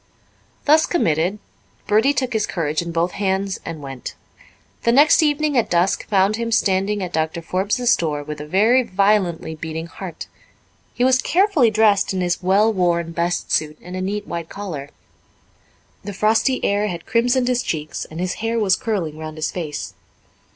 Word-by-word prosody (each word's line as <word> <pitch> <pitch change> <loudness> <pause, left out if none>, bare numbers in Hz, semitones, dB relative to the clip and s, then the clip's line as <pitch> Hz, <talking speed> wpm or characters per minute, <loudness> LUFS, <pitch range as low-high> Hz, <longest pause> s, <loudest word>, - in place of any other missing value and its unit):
Thus 310 +2 +5
committed, 175 - +1 0.5
Bertie 220 +7 +3
took 255 -3 -1
his 220 -2 0
courage 155 -3 -1
in 170 0 -5
both 170 +2 0
hands 195 -1 -1
and 160 -3 -7
went. 135 -2 -7 0.7
The 235 - +2
next 290 +6 +6
evening 300 -1 +1
at 240 - +2
dusk 175 +2 +1
found 200 +1 +2
him 230 0 -3
standing 200 -1 +1
at 180 - -6
Doctor 160 +1 -1
Forbes's 205 +8 +1
door 150 -3 -2
with 150 0 -7
a 150 - -8
very 220 +10 +4
violently 195 -6 +1
beating 160 +1 -5
heart. 175 +1 -8 0.7
He 245 - 0
was 260 0 +4
carefully 350 - +3
dressed 210 -3 +2
in 185 - -1
his 175 0 -1
well 200 +4 +3
worn 170 -3 0
best 170 +1 -2
suit 155 -1 0
and 180 +1 -9
a 185 - -3
neat 205 +2 -3
white 170 -1 -5
collar. 160 -9 -6 1.1
The 205 - -6
frosty 220 +6 +1
air 205 +1 +1
had 170 -4 -6
crimsoned 245 +2 +1
his 250 0 +1
cheeks 155 -6 -4
and 160 - -9
his 180 0 -1
hair 225 +1 -1
was 195 -3 +3
curling 170 -9 -3
round 155 -1 -7
his 155 - -2
face. 155 -5 -5
190 Hz, 170 wpm, -21 LUFS, 165-225 Hz, 1.1 s, next